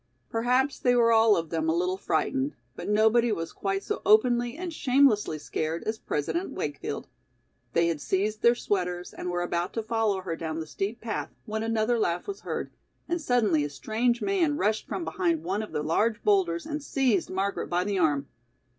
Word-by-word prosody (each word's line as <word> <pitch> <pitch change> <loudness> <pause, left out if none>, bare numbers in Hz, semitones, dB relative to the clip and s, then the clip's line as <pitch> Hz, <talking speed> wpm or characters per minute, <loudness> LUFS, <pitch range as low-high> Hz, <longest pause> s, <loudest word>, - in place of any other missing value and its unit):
Perhaps 250 +4 +1
they 245 -1 +3
were 230 -1 +5
all 225 -2 +6
of 165 -1 -3
them 160 -1 0
a 160 - +2
little 180 +2 +1
frightened, 265 - -1 0.2
but - - -6
nobody 220 +3 +4
was 165 -5 -3
quite 195 0 -2
so - - -3
openly 240 +4 +3
and 350 -1 -5
shamelessly 250 - +3
scared 155 +2 -3
as 220 0 -3
President 340 - -2
Wakefield. - - -4 0.7
They 170 - +3
had 165 -3 -1
seized 210 +5 -1
their 235 +1 +5
sweaters 180 -5 -2
and 180 - -5
were 175 0 -1
about 175 0 -2
to 225 - -2
follow 220 -3 0
her 175 -3 -3
down 160 -1 -4
the 160 - -4
steep 200 +8 -4
path, 225 -2 -3 0.2
when 220 0 -3
another 225 +1 +1
laugh 175 -4 0
was 400 -1 -5
heard, - - -4 0.4
and 345 0 -1
suddenly 220 - +2
a 145 - -2
strange 235 +10 0
man 340 -7 +1
rushed 215 -3 0
from 340 - -3
behind 340 -4 0
one 200 +3 -1
of 215 - -7
the 150 - -2
large 210 +8 +1
boulders 355 -6 +2
and 300 -1 -4
seized 260 - +1
Margaret 195 +1 -2
by 175 +1 +1
the 200 -1 -1
arm. 145 -4 +2
215 Hz, 190 wpm, -27 LUFS, 175-245 Hz, 0.7 s, all